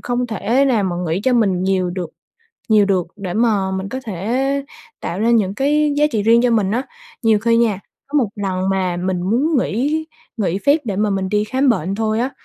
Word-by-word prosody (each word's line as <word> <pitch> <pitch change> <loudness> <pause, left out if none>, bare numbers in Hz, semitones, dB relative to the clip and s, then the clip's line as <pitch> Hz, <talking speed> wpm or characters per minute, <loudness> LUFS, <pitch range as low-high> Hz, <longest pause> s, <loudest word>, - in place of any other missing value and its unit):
không 245 0 -2
thể 235 +4 +1
nào 235 -7 +2
mà 175 -2 -2
nghĩ 165 +4 -1
cho 260 - +3
mình 195 -7 +2
nhiều 185 -2 0
được 175 -2 -5 0.6
nhiều 215 -2 +5
được 190 -3 +1
để 190 -3 -5
mà 210 -4 +1
mình 190 +1 -3
có 260 +5 -5
thể 255 +9 -1 0.4
tạo 180 - -4
ra 230 +2 +2
những 205 -5 +2
cái 295 +4 +2
giá 295 - +3
trị 220 -5 0
riêng 230 +2 +5
cho 250 - +3
mình 215 -4 +2
á. 235 +5 0 0.4
Nhiều 220 -2 +4
khi 230 +2 +2
nha, 220 -5 +1 0.3
có 295 - -3
một 235 -7 +1
lần 190 -2 -2
mà 185 -2 0
mình 180 0 -2
muốn 260 - +1
nghỉ 285 +8 -1 0.3
nghỉ 195 -4 -1
phép 285 +8 +3
để 205 -4 -3
mà 210 +1 +1
mình 195 -1 -1
đi 210 +1 +1
khám 265 +5 0
bệnh 195 -5 +1
thôi 220 +1 -1
á, 255 +3 -1
215 Hz, 220 wpm, -19 LUFS, 190-245 Hz, 0.6 s, nhiều